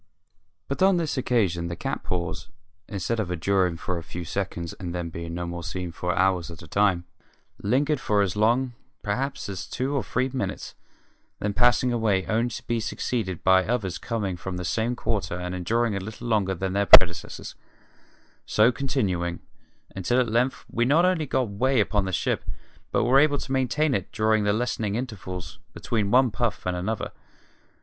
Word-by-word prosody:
But 140 - -4
on 190 -1 +5
this 165 -3 -1
occasion 100 -10 +1
the 85 - -4
cats - - -3
paws, 85 -2 -3 0.4
instead 105 +3 -2
of 100 -5 -1
enduring 90 0 +1
for 90 +1 -3
a - - -9
few 85 +2 -7
seconds 85 -3 -3
and 90 -2 -5
then 85 -1 -3
being 85 0 -6
no 85 0 -3
more 85 0 -5
seen 90 0 -4
for 90 +1 -2
hours 95 -3 +2
at 85 -1 -10
a - - -11
time, 95 0 +2 0.6
lingered 140 +7 +1
for 105 -4 +2
as 95 -1 -2
long, 120 +4 +2 0.3
perhaps, 135 +7 -2
as 95 -2 -5
two 130 +4 -2
or 135 - 0
three 130 +2 0
minutes, 130 - -3 0.6
then 105 -1 -2
passing 120 +2 +3
away 105 -5 +1
only 115 +2 +1
to 115 - -7
be 120 -1 0
succeeded 110 -5 -3
by 95 0 +5
others 105 -5 -2
coming 100 -6 -2
from 90 +1 -5
the 90 - -4
same 115 +6 0
quarter 105 -7 -2
and 90 0 -4
enduring 110 +5 0
a - - -1
little 110 +3 -8
longer 100 -4 +1
than 95 +2 -2
their 100 0 +1
predecessors, 85 -3 +6 0.9
so 110 +3 +4
continuing 95 - -1 0.6
until 95 +7 +1
at 125 - +2
length 125 +3 +1
we 120 - 0
not 150 +8 +4
only 180 -5 +1
got 130 -1 +1
way 125 +6 +1
upon 105 -1 +2
the 95 - -3
ship 90 - 0 0.5
but - - +2
were 130 +4 +5
able 145 0 +4
to 135 - -6
maintain 135 +3 +1
it 95 -7 -2
during 110 -1 +2
the 105 - +3
lessening 110 -2 -1
intervals 95 -8 -6
between 105 -4 -1
one 125 +1 +4
puff 115 -2 -2
and 90 0 0
another. 95 +5 -3
105 Hz, 185 wpm, -25 LUFS, 90-120 Hz, 0.9 s, predecessors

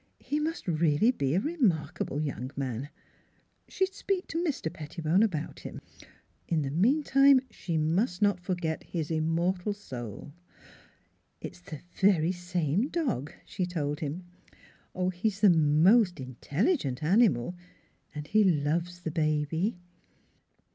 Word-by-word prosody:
He 295 - -2
must 320 - -3
really 165 +5 +3
be 140 - -1
a - - +4
remarkable 200 - -1
young 135 -4 -3
man. 135 0 -3 0.8
She 380 - -1
would 380 - -12
speak 390 -2 -2
to 330 +1 -1
Mr. 265 - -2
Pettibone 160 +4 0
about 185 -9 -1
him.... - - -8 0.7
In 160 -3 +1
the 135 - -3
meanwhile 275 - +4
she 170 -6 -3
must 175 +5 +1
not 205 -2 +2
forget 175 -3 -2
his 165 -3 -4
immortal 170 +5 0
soul. 130 - -8 0.5
" - - -34 0.3
It's - - -8
the 155 -4 -9 0.2
very 185 -4 +4
same 175 - -1
dog," 255 - -2
she 180 - -3
told 150 -4 -2
him. 160 +4 -4 0.4
" 185 0 -4
He's 195 +3 -1
the 205 -3 +7
most 170 +5 +4
intelligent 140 - -1
animal, 175 - +3 0.6
and 150 0 -5
he 215 +7 +3
loves 170 +1 0
the 160 - -3
baby." 160 +5 0
175 Hz, 135 wpm, -29 LUFS, 150-205 Hz, 0.8 s, the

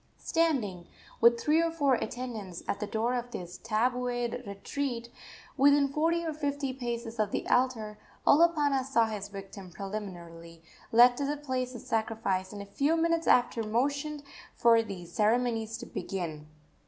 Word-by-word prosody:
Standing, 235 - 0 0.3
with 235 0 +6
three 305 +6 +3
or 335 - +1
four 290 -5 +2
attendants, 225 -6 -4
at 200 - -1
the 210 - -3
door 225 +3 0
of 245 -1 -3
his 175 -6 -7
tabued 245 +1 -1
retreat, 235 +4 -4 0.5
within 285 +1 +5
forty 330 +4 +1
or 320 - -2
fifty 285 -3 -2
paces 235 -2 -5
of 215 -1 +2
the - - -3
altar, 225 -5 +1 0.3
Olopana 295 -4 +4
saw 255 -3 +2
his 210 -3 -4
victim 195 -1 -9
preliminarily 170 -4 -8 0.3
led 245 +1 +7
to 280 - -1
the 295 +1 -1
place 255 -3 -3
of 240 - -7
sacrifice, 220 -4 -1
and 205 -1 -7
a - - -11
few 285 +11 +1
minutes 335 0 +1
after 245 -1 +4
motioned 280 +7 -1 0.3
for 230 -1 +5
the 195 -5 -7
ceremonies 225 +4 0
to - - -8
begin. 160 -6 -5
235 Hz, 155 wpm, -29 LUFS, 205-280 Hz, 0.5 s, led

